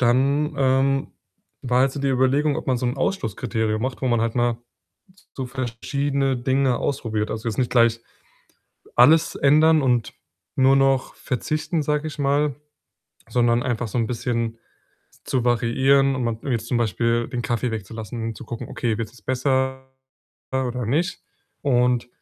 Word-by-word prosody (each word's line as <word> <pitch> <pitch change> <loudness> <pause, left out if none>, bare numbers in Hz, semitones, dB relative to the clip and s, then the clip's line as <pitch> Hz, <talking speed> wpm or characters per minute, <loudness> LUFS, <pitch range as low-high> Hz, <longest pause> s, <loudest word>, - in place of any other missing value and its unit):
dann, 140 +5 +2
ähm, 135 0 +2 0.5
war 125 -1 +2
halt 135 0 +3
so 140 - -5
die 140 - 0
Überlegung, 135 +3 +2
ob - - -6
man 130 - +2
so 125 - -2
'n 120 - -2
Ausschlusskriterium 110 - -1
macht, 130 0 -3
wo - - +1
man 120 -2 +2
halt 115 0 -1
mal 120 -1 +1 0.6
s 190 - -27
so 130 - -3
verschiedene 135 +2 -1
Dinge 130 0 +1
ausprobiert. 110 -6 -2
Also, 110 +1 -4
jetzt 110 - -2
nicht 125 -2 +1
gleich 115 -2 +4 1.0
alles 155 +7 +5
ändern 155 +3 +4
und 125 -4 +1 0.4
nur 135 +1 +5
noch 135 -1 +2
verzichten, 155 +5 -2
sage 150 +1 -1
ich 150 - -8
mal, 140 0 +1 0.7
sondern 120 -1 +2
einfach 120 -1 -2
so 105 - -3
'n 115 - +1
bisschen 115 -1 -2 0.7
zu 125 -3 -1
variieren 130 +3 +3
und 130 - -2
mal 115 -1 -2
jetzt 115 -1 -2
zum 120 - +1
Beispiel 115 +1 0
den 120 - -3
Kaffee 120 +1 -1
wegzulassen 110 +1 -6
und 115 -1 -4
zu - - -9
gucken: 120 - -7
„Okay, 115 -3 -2
wird's 115 -1 -5
jetzt 125 - -20
besser 130 0 0 0.6
oder 125 -2 -1
nicht?“ 170 +9 -1 0.4
Und 125 -3 +2
125 Hz, 160 wpm, -23 LUFS, 115-135 Hz, 1.0 s, alles